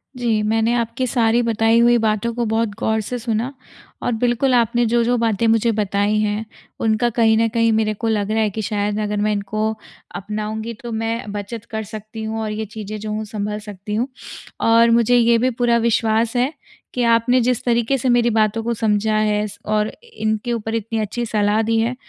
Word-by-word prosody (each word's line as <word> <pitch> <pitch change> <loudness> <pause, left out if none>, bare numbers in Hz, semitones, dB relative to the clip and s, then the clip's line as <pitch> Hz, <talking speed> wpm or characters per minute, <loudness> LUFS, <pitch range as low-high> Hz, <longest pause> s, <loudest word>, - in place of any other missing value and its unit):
जी, 235 -4 0
मैंने 225 +2 +1
आपकी 235 +2 -1
सारी 235 -1 +2
बताई 225 0 +3
हुई 240 0 +5
बातों 220 +1 0
को 240 0 -1
बहुत 225 0 0
गौर 220 -1 +1
से 245 +4 -4
सुना, 235 +3 -2 0.5
और - - -1
बिल्कुल, 245 +2 +2
आपने 240 0 +2
जो-जो 240 +1 +2
बातें 230 -1 +1
मुझे 225 +1 +3
बताई 205 0 0
हैं, 210 +1 -1 0.3
उनका 225 +2 +1
कहीं 225 -1 +3
न 230 - +3
कहीं, 230 0 +2
मेरे 215 -1 +1
को 220 +2 -4
लग 215 -2 0
रहा 220 0 +1
है 215 - +2
कि 220 +2 -4
शायद 205 0 -1
अगर 210 0 -2
मैं 215 0 +1
इनको 215 +2 -1 0.4
अपनाऊँगी, 215 +3 -4
तो 235 +2 -9
मैं 225 -1 -3
बचत 210 +2 -6
कर 220 0 -3
सकती 215 +1 -8
हूँ 220 0 -3
और 215 -1 -3
ये 215 +1 -3
चीज़ें, 215 0 -7
जो 215 0 -5
हों, 215 +1 -2
संभल 210 0 -4
सकती 210 0 -7
हूँ। 235 +4 0 0.5
और 230 +1 +5
मुझे 235 +1 +4
ये 235 0 +4
भी 255 +3 +2
पूरा 240 -1 +1
विश्वास 225 +1 +1
है 250 +3 +2 0.4
कि 250 - 0
आपने 235 +2 +3
जिस 245 0 0
तरीके 235 +2 +1
से 255 0 -1
मेरी 240 -1 +3
बातों 220 0 +1
को 235 +1 -1
समझा 215 -1 +1
है, 210 -1 +1
स 205 0 -11
और 215 0 +1 0.2
इनके 220 - -1
ऊपर 225 -1 -3
इतनी 225 0 -2
अच्छी 220 +3 -2
सलाह 210 0 +1
दी 225 +1 +1
है, 235 +3 0
225 Hz, 205 wpm, -20 LUFS, 215-235 Hz, 0.5 s, हुई